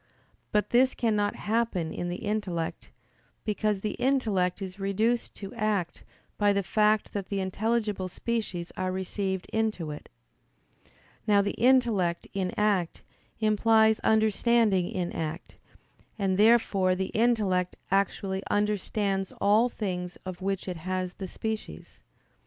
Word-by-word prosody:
But 210 0 +1
this 255 +2 +4
cannot 210 -3 +1
happen 210 -7 -1
in 175 - -3
the 180 +5 -5
intellect, 190 -6 -3 0.6
because 210 -2 0
the 210 - -2
intellect 215 -10 +1
is 190 0 -7
reduced 215 +5 0
to 195 -2 -8
act 205 -5 -1 0.4
by 205 -1 +4
the 200 0 0
fact 215 +2 +2
that 200 -2 -3
the 200 - -1
intelligible 210 0 -1
species 190 -4 -3
are 185 0 -1
received 190 0 -2
into 215 -8 -1
it. 150 - -9 1.2
Now 205 -1 +5
the 200 - -1
intellect 230 -9 +2
in 190 -2 -1
act 200 -5 +1 0.4
implies 220 0 +4
understanding 220 -3 +3
in 175 -2 -2
act; 160 +1 -5 0.6
and 195 -3 +1
therefore 205 -3 +4
the 190 +1 -3
intellect 210 -6 +2 0.2
actually 195 0 0
understands 205 -1 0
all 215 +4 +4
things 180 -6 -4
of 185 0 -6
which 195 0 -2
it 180 -2 -3
has 185 +2 -3
the 190 - -6
species. 215 - -6
200 Hz, 130 wpm, -28 LUFS, 185-220 Hz, 1.2 s, Now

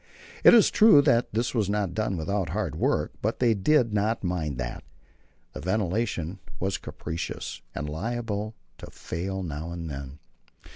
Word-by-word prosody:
It - - +9
is 225 - +6
true 210 -10 +7
that 120 -5 +3
this 115 +3 -1
was 110 -5 +1
not 100 -4 0
done 105 -3 -1
without 95 +4 -1
hard - - -2
work, - - +1
but 110 +2 -1
they 120 -2 +3
did 115 +3 +2
not 105 +2 0
mind 80 -7 -2
that. - - -4 0.7
The - - -7
ventilation 95 -1 -1 0.2
was 95 +1 -1
capricious, 85 +2 -5
and 75 - -3
liable 110 +5 -3 0.2
to - - -9
fail 95 +3 -4
now 80 0 -5
and 85 -2 -5
then. 70 0 -7
100 Hz, 155 wpm, -27 LUFS, 85-115 Hz, 0.7 s, It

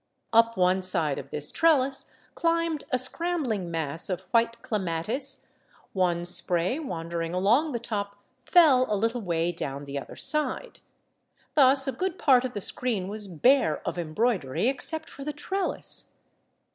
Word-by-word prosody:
Up 230 0 +3
one 185 +1 +2
side 170 -6 +1
of 135 - -10
this 150 0 0
trellis 275 -5 +1 0.3
climbed 335 -2 -1
a 255 - +1
scrambling 255 - 0
mass 165 0 0
of 185 -1 -3
white 230 0 +1
clematis; 215 - +1 0.4
one 175 -2 0
spray 180 - +4
wandering 170 - -5
along 235 - +2
the 240 - -3
top 200 -3 -5 0.3
fell 275 -5 +4
a 210 - +1
little 225 +4 -1
way 170 -3 -1
down 140 -4 -5
the 140 0 -5
other - - -11
side. 305 +11 0 0.7
Thus 270 -1 +4
a - - 0
good 365 +8 -4
part 260 -4 +3
of 255 -1 -5
the 205 - -5
screen 210 -4 -2
was 210 0 -6
bare 185 - +1
of - - -3
embroidery, 175 - -1
except 320 +4 -1
for 275 - -11
the 300 +1 -5
trellis. 375 +6 -1
225 Hz, 150 wpm, -26 LUFS, 175-275 Hz, 0.7 s, spray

